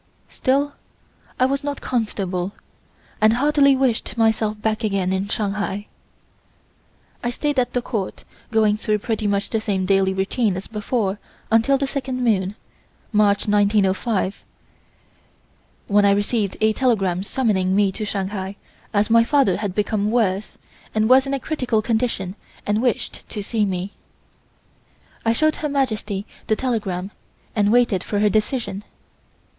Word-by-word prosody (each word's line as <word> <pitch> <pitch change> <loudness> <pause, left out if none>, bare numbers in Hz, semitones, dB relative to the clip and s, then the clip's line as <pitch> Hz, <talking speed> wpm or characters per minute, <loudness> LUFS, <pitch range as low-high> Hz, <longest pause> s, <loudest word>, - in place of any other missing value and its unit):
Still, 285 +2 0 0.7
I 255 - +5
was 275 +2 0
not 285 -1 -3
comfortable, 195 -6 -2 0.7
and 215 +1 +6
heartily 280 +2 +4
wished 255 -3 0
myself 220 -1 +1
back 215 +1 -1
again 195 -3 0
in 190 +1 -1
Shanghai. 205 -1 -2 1.4
I 240 - 0
stayed 290 +2 -1
at 245 - 0
the 245 - 0
Court, 210 -7 -4 0.3
going 215 -2 +3
through 215 0 0
pretty 215 0 -2
much 200 0 -1
the 225 - 0
same 195 -4 -1
daily 195 0 +3
routine 190 +1 0
as 190 - -6
before 210 -2 -2 0.3
until 230 +5 +4
the 275 - 0
second 265 -2 -3
moon 200 -4 +1 0.6
(March 210 -2 +3
1905), 205 0 +1 1.4
when 205 0 +3
I 200 - +5
received 205 0 0
a 220 0 +4
telegram 195 -8 +1
summoning 195 -4 0
me 200 -1 +3
to 215 - -5
Shanghai 195 -1 -3 0.4
as 205 +2 +2
my 230 0 +7
father 265 -7 +3
had 205 -3 -3
become 210 0 0
worse, 215 -4 0 0.4
and 215 0 +3
was 260 +1 +6
in 275 - -2
a - - -3
critical 250 -7 -1
condition 220 -5 -1 0.3
and 210 +2 +1
wished 245 -3 -2
to 205 - -5
see 215 0 0
me. 190 0 -3 1.3
I 225 - +3
showed 310 +6 +2
Her 300 - -2
Majesty 220 -8 -1 0.2
the 220 - +3
telegram 205 -7 -2 0.4
and 205 -1 +3
waited 235 -6 +3
for 205 - -2
her 210 +1 +3
decision. 215 -2 -1
215 Hz, 145 wpm, -22 LUFS, 200-245 Hz, 1.4 s, my